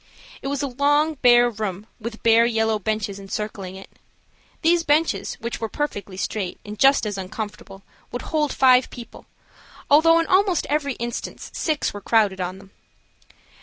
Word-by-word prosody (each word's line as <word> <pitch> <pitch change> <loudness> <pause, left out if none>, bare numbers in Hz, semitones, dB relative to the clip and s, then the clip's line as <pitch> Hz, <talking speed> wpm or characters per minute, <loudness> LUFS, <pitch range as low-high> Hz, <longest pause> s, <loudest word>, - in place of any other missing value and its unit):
It - - -5
was 280 +1 -2
a - - 0
long, 290 +4 +2
bare 240 -1 +6
room, 210 -4 -4
with 225 0 -7
bare 230 +1 +5
yellow 225 -2 +1
benches 205 -1 -3
encircling 195 -1 -5
it. 195 - -11 0.8
These 340 +1 +4
benches, 295 - +1
which 235 0 -6
were 225 - -2
perfectly 205 -10 -4
straight, 195 -2 -3
and 210 0 -8
just 275 -3 +5
as 205 -2 -3
uncomfortable, 195 0 -7 0.3
would 245 - -5
hold 300 -3 0
five 255 -1 +4
people, 240 -1 -11 0.6
although 330 +3 +6
in 330 - +1
almost 370 -1 +2
every 290 -2 0
instance 235 0 -6
six 310 -3 -1
were 205 - -7
crowded 205 -4 +2
on 180 +1 -4
them. 195 0 -16
230 Hz, 160 wpm, -23 LUFS, 205-285 Hz, 0.8 s, bare